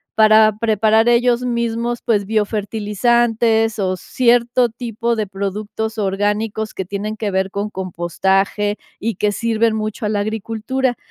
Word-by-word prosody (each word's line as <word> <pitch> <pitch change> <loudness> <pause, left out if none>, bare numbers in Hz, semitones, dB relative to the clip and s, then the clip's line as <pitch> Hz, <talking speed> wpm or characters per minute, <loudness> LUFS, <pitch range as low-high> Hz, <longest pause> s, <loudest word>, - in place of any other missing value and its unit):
para 215 -1 +5
preparar 220 +1 +3
ellos 240 0 +3
mismos, 235 0 -2
pues, 205 -4 +1
biofertilizantes 220 +1 +1
o 185 -1 0
cierto 240 +3 +2
tipo 235 0 -3
de 215 - -1
productos 205 +3 -4
orgánicos 210 +2 -1
que 190 - -3
tienen 205 +3 -4
que 210 -2 -2
ver 190 0 0
con 205 +2 -4
compostaje, 190 +3 -1 0.2
y 225 +1 -2
que 210 -1 0
sirven 225 0 +1
mucho 215 +1 -3
a - - 0
la 210 - 0
agricultura. 225 +4 -2
215 Hz, 135 wpm, -19 LUFS, 205-230 Hz, 0.2 s, para